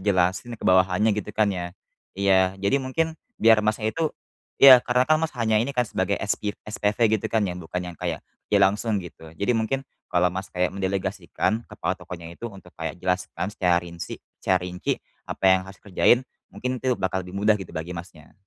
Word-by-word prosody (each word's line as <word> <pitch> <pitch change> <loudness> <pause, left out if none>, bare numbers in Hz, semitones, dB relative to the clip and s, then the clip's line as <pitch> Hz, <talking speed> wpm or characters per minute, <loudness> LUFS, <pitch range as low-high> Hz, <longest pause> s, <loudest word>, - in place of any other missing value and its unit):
jelasin 95 +4 +1
ke - - -11
bawahannya 95 +3 +4
gitu, 105 -1 -3
kan, 105 -2 +3
ya. 90 0 -5 0.4
Iya, 95 -1 +3
jadi 100 +8 +1
mungkin 160 +5 -1 0.2
biar 110 -1 +5
Masnya 110 +1 0
itu 165 -1 0 0.5
iya, 135 -2 +11
karena, 125 +1 +2
kan, 155 - +6
Mas 160 -1 -1
hanya 110 -1 +2
ini, 130 +5 -1
kan, 125 - +3
sebagai - - 0
espiv 105 -1 -1 0.2
SPV 105 +1 +1
gitu, - - -4
kan, 110 - +3
ya, - - -2
bukan 90 +1 -4
yang 85 - -16
kayak, - - -2 0.3
ya, - - +6
langsung 105 +3 +2
gitu. 80 -2 -12
Jadi 100 +7 +1
mungkin 115 +4 0 0.3
kalau, 90 0 +3
Mas, 95 +1 -5
kayak 90 0 +1
mendelegasikan 100 +3 -2
kepala - - -2
tokonya 85 -2 -9
itu - - -10
untuk 95 -4 -13
kayak 80 0 -3
jelaskan 90 0 -1
secara 90 -4 +2
rinsi 85 -2 -7 0.2
secara 95 - +2
rinci 90 0 -2 0.3
apa - - -5
yang 95 0 +5
harus 95 - -11
dikerjain, 105 +4 +3 0.3
mungkin 125 0 -3
itu 130 -1 +1
bakal 95 0 -1
lebih 90 - -10
mudah 105 +1 +5
gitu 95 - -9
bagi 80 +3 -4
Masnya. 85 -3 -11
100 Hz, 190 wpm, -25 LUFS, 90-110 Hz, 0.5 s, iya